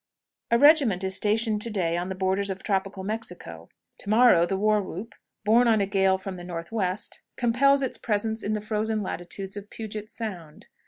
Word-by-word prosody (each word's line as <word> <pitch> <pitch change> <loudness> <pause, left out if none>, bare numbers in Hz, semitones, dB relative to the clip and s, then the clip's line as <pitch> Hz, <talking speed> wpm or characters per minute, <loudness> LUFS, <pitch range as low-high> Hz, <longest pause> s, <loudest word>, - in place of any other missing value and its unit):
A 235 - +4
regiment 275 - +5
is 190 0 0
stationed 215 0 +1
to 230 - 0
day 175 -6 -1
on 175 +1 -2
the 190 - -4
borders 190 +1 0
of 190 0 -5
tropical 195 -1 -2
Mexico; 180 - -6 0.3
to - - -8
morrow, 215 -6 +5
the 195 - -1
war 210 +1 +2
whoop, 195 +4 -7 0.3
borne 235 +3 +5
on 220 -2 +4
a 200 - +2
gale 190 -1 +2
from 190 -1 -7
the 175 - -9
northwest, 180 +3 -4 0.2
compels 275 +4 +3
its 260 - -3
presence 220 +1 -1
in 210 - -2
the 210 - -2
frozen 215 0 -1
latitudes 190 +2 -5
of 205 0 -8
Puget's 215 0 -7
Sound. 180 -9 -7
205 Hz, 190 wpm, -26 LUFS, 190-225 Hz, 0.3 s, regiment